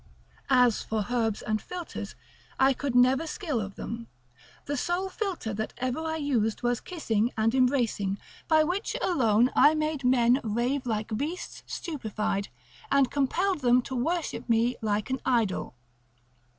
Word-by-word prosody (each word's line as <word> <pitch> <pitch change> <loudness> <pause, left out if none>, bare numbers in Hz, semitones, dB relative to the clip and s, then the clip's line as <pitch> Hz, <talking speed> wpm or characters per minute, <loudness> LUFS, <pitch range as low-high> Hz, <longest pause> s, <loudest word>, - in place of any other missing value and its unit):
As 250 -4 +4
for 220 -2 -2
herbs 225 -4 0
and 215 -1 -1
philters, 360 -2 -7 0.4
I 270 +1 +5
could 270 -1 -3
never 260 +5 +4
skill 305 - -2
of 195 -1 -6
them, 230 0 -6 0.6
The 290 - -2
sole 350 +7 -1
philter 365 - -3
that 220 +1 -4
ever 255 +3 -2
I 320 0 -2
used 250 -8 0
was 240 0 +1
kissing 235 - -1
and 225 +1 +2
embracing, 245 -7 +1 0.3
by 315 -1 +5
which 370 +10 -2
alone 245 - +3
I 300 +2 +6
made 305 -2 -1
men 250 0 +4
rave 245 +5 -1
like 215 -1 -2
beasts 305 +9 -4
stupefied, 215 - -3 0.4
and 275 -2 +3
compelled 345 +7 +1
them 250 0 +4
to 260 - -5
worship 320 +1 -2
me 235 +2 +3
like 215 +2 -1
an 260 - 0
idol. 225 - 0
250 Hz, 150 wpm, -28 LUFS, 225-305 Hz, 0.6 s, I